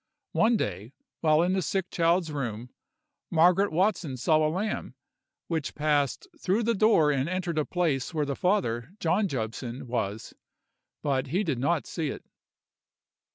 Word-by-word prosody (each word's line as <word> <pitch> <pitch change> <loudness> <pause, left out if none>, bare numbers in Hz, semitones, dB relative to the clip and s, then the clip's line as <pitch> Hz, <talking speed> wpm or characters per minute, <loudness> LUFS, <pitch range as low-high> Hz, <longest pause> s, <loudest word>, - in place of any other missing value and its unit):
One 230 +1 +3
day, 105 - -4 0.3
while 155 0 +4
in 180 +1 +1
the 190 - +1
sick 190 +1 -2
child's 170 -1 +2
room, 125 -4 -4 0.6
Margaret 180 +4 +4
Watson 170 -6 0
saw 155 +6 +3
a 155 0 +2
lamb, 195 +7 -3 0.5
which 160 -4 -2
passed 145 - +1
through 200 +2 +1
the 230 +1 +2
door 200 -8 +4
and 140 +2 0
entered 180 -3 -1
a 150 - 0
place 160 -7 0
where 155 -3 0
the 140 -1 -2
father, 160 - 0
John 200 +5 +2
Jobson, 120 - -4
was; 110 -3 -3 0.7
but 135 -3 0
he 180 +10 0
did 150 -10 -1
not 155 +4 +1
see 160 -3 -3
it. - - -6
155 Hz, 155 wpm, -27 LUFS, 135-185 Hz, 0.7 s, while